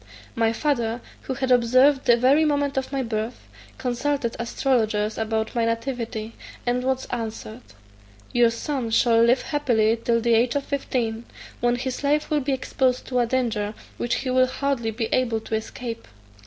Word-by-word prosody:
"My 225 -1 +2
father, 235 -3 0 0.2
who 260 - -4
had 260 0 -1
observed 255 +3 +4
the 240 -2 +5
very 270 +6 +4
moment 285 -2 +1
of 265 0 -2
my 270 -1 -1
birth, 225 0 -4 0.3
consulted 255 0 -1
astrologers 225 -3 0
about 220 0 -2
my 235 -2 +1
nativity; 230 -1 -3 0.3
and 245 +1 0
was 260 0 0
answered, 225 - -5 0.7
'Your 240 -1 +5
son 240 +1 -3
shall 230 0 +4
live 235 +3 +4
happily 230 -7 +2
till 230 -1 +2
the 235 0 +2
age 235 +3 +3
of 285 - 0
fifteen, 240 -5 -2 0.3
when 240 0 +2
his 255 +2 -4
life 295 +2 +1
will 300 -1 +2
be 275 +1 -1
exposed 260 -1 0
to 250 -1 +1
a 240 - +2
danger 225 -4 -1 0.2
which 240 - -1
he 255 - 0
will 255 0 +4
hardly 260 -3 -1
be 225 +1 -2
able 235 -3 +1
to 220 - -8
escape. 230 +1 -4
240 Hz, 170 wpm, -24 LUFS, 230-265 Hz, 0.7 s, the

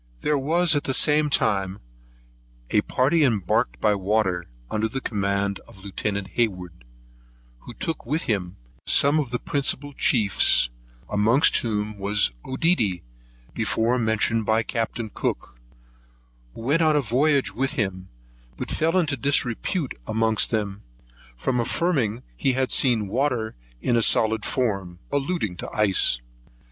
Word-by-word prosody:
There 150 - +1
was 160 +4 +2
at 145 - -1
the 135 - 0
same 150 0 +3
time 100 -7 0 0.9
a - - +4
party 150 +5 +1
embarked 95 - 0
by 105 - +3
water, 95 -3 0 0.2
under 110 +1 0
the 135 - -3
command 100 -3 -1
of - - -16
Lieutenant 100 0 -4
Hayward, 90 - -3 0.7
who 120 - -11
took 165 +9 -3
with 150 +7 -2
him 95 -4 -2 0.3
some 145 +2 +4
of 140 -5 -2
the 125 - -1
principal 145 +1 -1
chiefs, 100 - +3 0.4
amongst 110 +8 +3
whom 105 -2 -2
was 100 -6 +2
Oedidy, 130 - 0 0.5
before 120 +3 0
mentioned 110 0 +1
by 110 +2 +1
Captain 115 -1 -3
Cook, - - -4 1.0
who - - -9
went 145 +8 +1
a 155 -2 +3
voyage 140 +3 +1
with 135 +3 -1
him, 95 -8 -2 0.5
but - - -5
fell 165 +3 +1
into 155 -6 +1
disrepute 135 - 0
amongst 110 0 +2
them, 105 -3 -2 0.6
from 125 - -1
affirming 120 - 0
he 130 - +1
had 130 0 0
seen 115 -6 +2
water 120 0 -1 0.3
in 120 - +1
a 115 - +3
solid 110 -1 +2
form; 100 -8 -2
alluding 140 - -2
to - - -6
the - - -10
ice. 95 - +3
115 Hz, 135 wpm, -24 LUFS, 100-135 Hz, 1.0 s, a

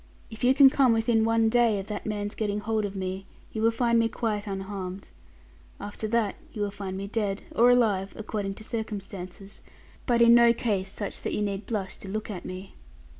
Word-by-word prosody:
If 220 - -9
you 255 +2 +5
can 280 -1 +9
come 265 -4 +4
within 225 0 +2
one 225 0 +3
day 230 -2 +3
of 195 - -4
that 210 0 -5
man's 205 -1 -3
getting 210 -1 -2
hold 220 0 0
of 200 0 -5
me, 190 0 -4 0.3
you 220 - -3
will 225 - +5
find 235 0 +2
me 225 0 +2
quite 215 -3 -2
unharmed. 195 -1 -5 0.7
After 205 +2 -5
that 220 -2 0
you 210 - -3
will 205 - -2
find 195 -2 -5
me 195 - -4
dead, 200 -1 -2
or 240 +2 +5
alive, 210 -6 +2
according 205 -2 -4
to 220 - -11
circumstances, 200 -4 -6 0.5
but 235 -2 +4
in 235 0 +7
no 235 0 +7
case 200 -5 -1
such 205 0 -5
that - - -3
you 210 - 0
need 200 0 -3
blush 200 -5 -3
to - - -9
look 215 +2 -4
at 180 -4 -7
me.' 185 +1 -7
210 Hz, 205 wpm, -27 LUFS, 195-230 Hz, 0.7 s, can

